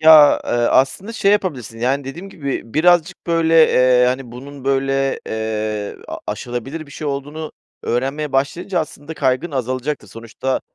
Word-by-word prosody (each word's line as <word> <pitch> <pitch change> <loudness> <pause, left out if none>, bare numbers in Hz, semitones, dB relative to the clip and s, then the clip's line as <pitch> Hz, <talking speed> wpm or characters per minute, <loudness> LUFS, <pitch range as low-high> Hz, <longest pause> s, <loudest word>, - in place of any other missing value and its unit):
Ya, 155 -2 +8
eee, - - -4
aslında, 135 - +2
şey 200 -2 +3
yapabilirsin, 135 - -2
yani, 135 +3 +1
dediğim 170 +9 -7
gibi, 140 -8 -5
birazcık, 175 +2 +3
böyle, 165 -1 +5
eee, 125 -1 +5
hani, 125 -1 -2
bunun, 135 +2 -10
böyle, 135 0 +1
eee, 110 -1 -3
a - - -4
aşılabilir 135 +6 -5
bir - - -16
şey 155 - -6
olduğunu 145 +3 -4 0.3
öğrenmeye 135 +4 -1
başlayınca, 170 +7 0
aslında 155 0 -7
kaygın 135 +4 0
azalacaktır. 130 -2 -3
Sonuçta 115 +4 -3
135 Hz, 145 wpm, -19 LUFS, 125-155 Hz, 0.3 s, Ya